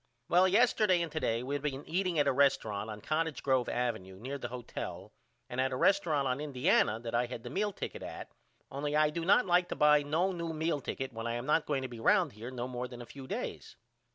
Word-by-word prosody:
Well 180 +2 +5
yesterday 210 -2 +4
and 165 - -5
to 155 - -2
day 115 -4 0
we 140 +3 -2
been 140 0 -4
eating 180 0 0
at 145 -1 +3
a 140 - +3
resturunt 110 -6 +1
on 105 -1 -7
Cottage 155 0 -1
Grove 130 -3 +2
Ave 120 -2 0
near 95 +10 -7
the 120 - -4
hotel 120 -1 -7 0.4
and 125 +1 -2
at 130 - +1
the 130 - -3
resturunt 160 -5 +3
on 130 +2 -1
Indiana 130 -6 +2
that 115 0 -6
I 120 +1 +2
had 120 -2 -7
the 120 - -7
meal 205 +1 0
ticket - - -6
at - - -7 0.4
only 145 +2 -2
I 155 0 +4
do 165 +2 -3
not 200 +8 +4
like 180 -1 +3
to - - -3
buy 150 0 +5
no 160 +6 +1
new 170 -2 -4
meal 160 -2 -1
ticket 135 -1 -4
when 115 +1 -4
I 115 - -1
am 120 +1 -4
not 150 +2 +2
going 140 -3 0
to - - -2
be 120 -2 -9
round - - +3
here 110 +4 -8
no 125 -1 -4
more 125 0 -4
than 120 -1 -9
a - - -11
few 135 +2 -10
days. - - -5
140 Hz, 240 wpm, -32 LUFS, 120-160 Hz, 0.4 s, Well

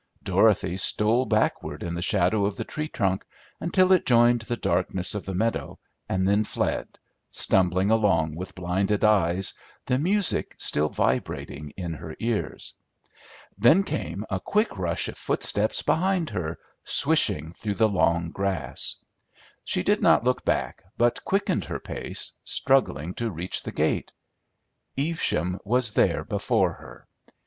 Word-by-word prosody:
Dorothy 90 - +2
stole 110 +6 +2
backward 110 -1 -1
in 85 - -4
the 85 - -4
shadow 100 +2 +2
of 100 - -5
the - - -3
tree 155 0 -5
trunk, 95 -9 -1 0.4
until 185 +2 +2
it 185 - +5
joined 120 -1 +4
the 120 +2 -3
darkness 90 0 0
of 105 - -5
the 95 - -3
meadow, 110 +4 -2 0.3
and 95 0 0
then 100 +2 +3
fled, - - -3 0.3
stumbling 95 +2 +2
along 85 -9 +2
with 90 +3 -7
blinded 95 +3 -1
eyes, 95 -3 +3 0.3
the 125 - +1
music 195 +5 +1
still 75 +1 +1
vibrating 75 +1 -2
in 85 -3 -4
her 80 0 -8
ears. 115 -2 -3 0.9
Then 190 +6 +5
came 105 - -4
a 95 - -2
quick 210 - 0
rush 85 -4 -1
of - - -7
footsteps 105 +1 0
behind 180 -1 +1
her, 85 -2 -3 0.3
swishing 80 +2 +2
through 105 +2 -4
the 110 +1 +3
long 85 -4 +1
grass. 95 -6 -1 0.7
She - - -1
did - - +2
not - - +4
look - - 0
back, - - -1 0.2
but 120 0 +1
quickened 195 +1 0
her - - -5
pace, - - -4
struggling 110 - +1
to 115 +2 -3
reach 90 -1 -3
the - - -6
gate. - - -1 0.9
Evesham 135 - -1
was 120 +2 +2
there - - +2
before - - 0
her. - - -14
100 Hz, 145 wpm, -25 LUFS, 90-120 Hz, 0.9 s, it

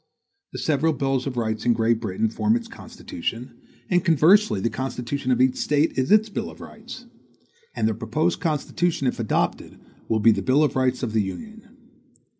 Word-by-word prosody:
The - - -7
several 155 +1 +1
bills 135 -1 -1
of 125 -2 -5
rights 110 -2 -2
in 120 - +3
Great 115 0 +1
Britain 110 0 -1
form 205 - +1
its 240 -1 -3
Constitution, 130 - -7 0.3
and 180 -1 +2
conversely 170 - +4
the 115 +5 -1
constitution 130 0 -3
of 125 - +2
each 130 0 +3
State 150 +2 +1
is 130 +5 0
its 215 +1 +5
bill 205 - -4
of - - -13
rights. - - -11 0.7
And 110 - +1
the 110 - 0
proposed 125 +10 -1
Constitution, 160 0 -1
if 125 - -1
adopted, 115 - -2 0.3
will 110 - +1
be 115 +2 +5
the - - -1
bill 140 +4 +3
of 150 - 0
rights 130 0 0
of 115 -3 -2
the 110 - +2
Union. 220 - -8
130 Hz, 185 wpm, -23 LUFS, 115-170 Hz, 0.7 s, its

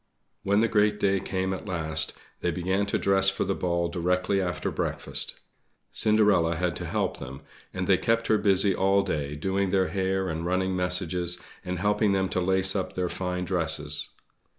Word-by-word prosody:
When 100 +2 +2
the 115 - +3
great 105 -1 +2
day 100 -1 +2
came 95 0 -2
at 95 +3 -7
last, 80 -5 -1 0.3
they 90 - -1
began 95 +4 -1
to - - 0
dress 95 0 +3
for 95 - -2
the 95 - -1
ball 85 -2 -1
directly 90 +3 0
after 90 -1 -2
breakfast. - - -2 0.5
Cinderella 105 -6 +3
had 90 0 -1
to - - -5
help - - -1
them; 70 0 -8 0.3
and - - -3
they - - +3
kept 115 0 +1
her 110 - +2
busy 100 -1 +3
all 95 +1 +2
day 75 -6 -3
doing 95 +5 -1
their 95 -1 +1
hair, 95 -1 -1
and 80 -1 -3
running 95 +1 0
messages, 90 -1 0 0.2
and 90 0 -3
helping 105 +2 +2
them 95 -1 +1
to 90 - -1
lace 95 +1 +3
up 95 - -2
their 90 -1 -1
fine 90 0 -3
dresses. 80 -4 0
95 Hz, 180 wpm, -27 LUFS, 90-100 Hz, 0.5 s, the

